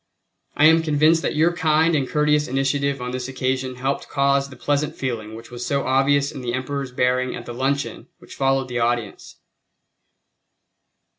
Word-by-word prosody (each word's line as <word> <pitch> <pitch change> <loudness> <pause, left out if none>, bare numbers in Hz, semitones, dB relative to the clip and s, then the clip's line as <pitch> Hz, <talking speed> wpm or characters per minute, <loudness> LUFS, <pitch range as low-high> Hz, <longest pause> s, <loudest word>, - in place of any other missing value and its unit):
I 150 - +4
am 165 +1 +6
convinced 155 +1 +3
that - - -2
your 165 +3 +3
kind 160 -1 +2
and 135 -4 0
courteous 150 0 +2
initiative 135 +1 0
on 125 - -4
this 125 0 -4
occasion 130 0 -2
helped 135 +2 -3
cause 140 0 +1
the 130 - -11
pleasant 145 +3 -1
feeling 110 -4 -4
which 115 +2 -12
was 120 0 -6
so 140 +1 -1
obvious 140 +2 +2
in 135 - -8
the 120 -1 -2
Emperor's 135 0 -4
bearing 125 0 0
at - - -8
the 120 - -7
luncheon 135 +3 -2
which - - -14
followed 135 -1 +1
the 125 -1 -3
audience. 120 -3 -2
135 Hz, 170 wpm, -22 LUFS, 125-145 Hz, -, am